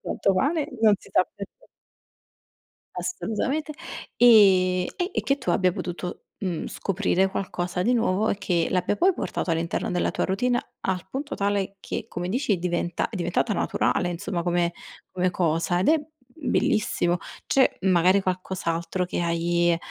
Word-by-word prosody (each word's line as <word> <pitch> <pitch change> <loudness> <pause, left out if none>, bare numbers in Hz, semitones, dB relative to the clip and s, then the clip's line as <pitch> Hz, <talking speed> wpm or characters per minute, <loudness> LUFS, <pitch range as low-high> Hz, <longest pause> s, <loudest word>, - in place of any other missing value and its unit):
Tanto 195 - 0
pane, 290 - +1
non 215 -2 +6
si - - -18
sa - - +4
perché. 205 - -11 1.3
Assolutamente, 300 - -2 0.4
e 190 -6 +6
e 360 +2 -2
e - - 0
che 275 +1 +1
tu 260 - -1
abbia 185 -2 +3
potuto, 175 +1 -6
mhmm, 180 -5 -3
scoprire 190 -1 0
qualcosa 180 -2 -3
di 245 +6 +2
nuovo 215 -2 +1
e 200 - 0
che 175 -4 0
l'abbia 185 +2 +1
poi 375 +2 +4
portato 185 - -3
all'interno 165 +1 -1
della 180 - 0
tua - - -1
routine, 245 +6 +1 0.2
al 190 -1 -2
punto 280 +5 -4
tale 200 -1 -1
che, - - -5
come 175 0 -4
dici, 230 -4 +1
diventa 175 -1 -1
è 225 - -8
diventata 180 +5 0
naturale, 175 -2 0
insomma, 175 0 -3
come 175 -1 +1 0.4
come 185 0 +1
cosa, 170 +1 +1
ed 190 - +2
è 315 -1 +4 0.4
bellissimo. 215 -9 +1 0.3
C'è 265 -1 +2
magari 185 +1 +4
qualcos'altro 180 -1 -2
che 180 - -3
hai, 170 0 +1
185 Hz, 150 wpm, -25 LUFS, 175-220 Hz, 1.3 s, non